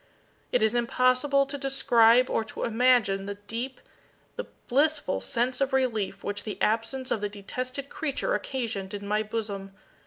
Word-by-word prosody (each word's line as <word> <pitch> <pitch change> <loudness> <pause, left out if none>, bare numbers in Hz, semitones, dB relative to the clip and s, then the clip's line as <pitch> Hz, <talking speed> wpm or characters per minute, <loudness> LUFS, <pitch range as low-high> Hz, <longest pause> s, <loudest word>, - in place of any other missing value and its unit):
It 245 - +2
is 220 +1 +3
impossible 255 +3 +3
to 280 +1 -6
describe 250 -3 +4
or 225 - 0
to 215 - -6
imagine 230 -5 +3
the 200 - -4
deep, 230 +6 -5 0.6
the - - -5 0.2
blissful 295 +3 +1
sense 250 +2 0
of 275 0 +1
relief 220 -7 0
which 205 0 -3
the 210 - -6
absence 230 +4 0
of 215 - 0
the 205 - -1
detested 255 +7 -5
creature 315 - -2
occasioned 220 - -3
in 200 0 -6
my 210 +1 +1
bosom. 205 -3 -4
235 Hz, 155 wpm, -27 LUFS, 210-265 Hz, 0.6 s, describe